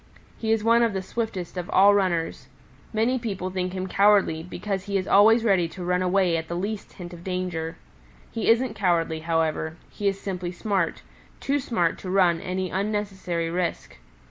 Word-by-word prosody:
He 220 Hz, -1 st, -1 dB
is 225 Hz, -1 st, +2 dB
one 230 Hz, +1 st, +4 dB
of 230 Hz, -3 st, +2 dB
the 190 Hz, -1 st, -3 dB
swiftest 195 Hz, -6 st, -4 dB
of 180 Hz, -1 st, -4 dB
all 200 Hz, +2 st, +6 dB
runners. 170 Hz, -9 st, 0 dB, 0.4 s
Many 235 Hz, +4 st, +1 dB
people 195 Hz, -5 st, -4 dB
think 185 Hz, -1 st, -2 dB
him 185 Hz, 0 st, -3 dB
cowardly 195 Hz, -4 st, +3 dB
because 190 Hz, +2 st, -4 dB
he 200 Hz, -1 st, 0 dB
is 185 Hz, 0 st, -3 dB
always 225 Hz, +3 st, +6 dB
ready 190 Hz, -6 st, +3 dB
to 180 Hz, +2 st, -8 dB
run 180 Hz, +1 st, +1 dB
away 180 Hz, -2 st, +2 dB
at 160 Hz, 0 st, -4 dB
the 170 Hz, -, -4 dB
least 200 Hz, +4 st, -4 dB
hint 175 Hz, -1 st, -9 dB
of 170 Hz, 0 st, -11 dB
danger. 180 Hz, -3 st, -3 dB, 0.5 s
He 225 Hz, -, -1 dB
isn't 230 Hz, 0 st, +3 dB
cowardly, 170 Hz, -5 st, +1 dB
however; 160 Hz, 0 st, -1 dB
he 205 Hz, -, -2 dB
is 195 Hz, 0 st, 0 dB
simply 180 Hz, -3 st, -4 dB
smart 190 Hz, -2 st, -1 dB, 0.4 s
too 285 Hz, +1 st, 0 dB
smart 220 Hz, -10 st, 0 dB
to 185 Hz, -, -7 dB
run 180 Hz, -3 st, +3 dB
any 185 Hz, 0 st, -3 dB
unnecessary 195 Hz, -4 st, -2 dB
risk. 175 Hz, 0 st, -3 dB
185 Hz, 180 wpm, -25 LUFS, 175-205 Hz, 0.5 s, all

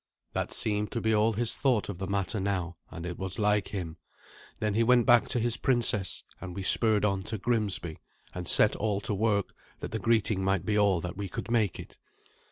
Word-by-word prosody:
That -, -, -2 dB
seemed 105 Hz, -1 st, -1 dB
to 115 Hz, -, -1 dB
be 110 Hz, 0 st, +1 dB
all 110 Hz, +1 st, +3 dB
his 115 Hz, +2 st, +1 dB
thought 125 Hz, -6 st, +1 dB
of 100 Hz, -4 st, -6 dB
the 95 Hz, -, -4 dB
matter 100 Hz, +1 st, -2 dB
now, 95 Hz, -3 st, -2 dB, 0.2 s
and 85 Hz, -1 st, -8 dB
it 90 Hz, -1 st, -6 dB
was 95 Hz, -1 st, -4 dB
like 105 Hz, -1 st, +1 dB
him. 85 Hz, -5 st, -5 dB, 0.6 s
Then 105 Hz, -1 st, -1 dB
he 110 Hz, -, +2 dB
went 120 Hz, 0 st, +4 dB
back 120 Hz, -2 st, +5 dB
to 125 Hz, -, -1 dB
his 120 Hz, 0 st, 0 dB
princess, 120 Hz, -7 st, 0 dB, 0.2 s
and 90 Hz, -2 st, -7 dB
we 100 Hz, -, -4 dB
spurred 105 Hz, +1 st, +4 dB
on 95 Hz, -2 st, 0 dB
to 110 Hz, 0 st, -4 dB
Grimsby, 100 Hz, -7 st, -2 dB, 0.3 s
and 90 Hz, -1 st, -6 dB
set 105 Hz, -, +5 dB
all 105 Hz, -2 st, -1 dB
to 100 Hz, +1 st, -2 dB
work, 100 Hz, -1 st, 0 dB, 0.3 s
that -, -, -6 dB
the 110 Hz, -, -3 dB
greeting 110 Hz, -4 st, +1 dB
might 95 Hz, -2 st, 0 dB
be 105 Hz, -, 0 dB
all 100 Hz, -4 st, +3 dB
that 90 Hz, +1 st, -6 dB
we 100 Hz, -1 st, -4 dB
could 115 Hz, -, -6 dB
make 110 Hz, -6 st, +1 dB
it. -, -, -11 dB
105 Hz, 215 wpm, -28 LUFS, 95-110 Hz, 0.6 s, back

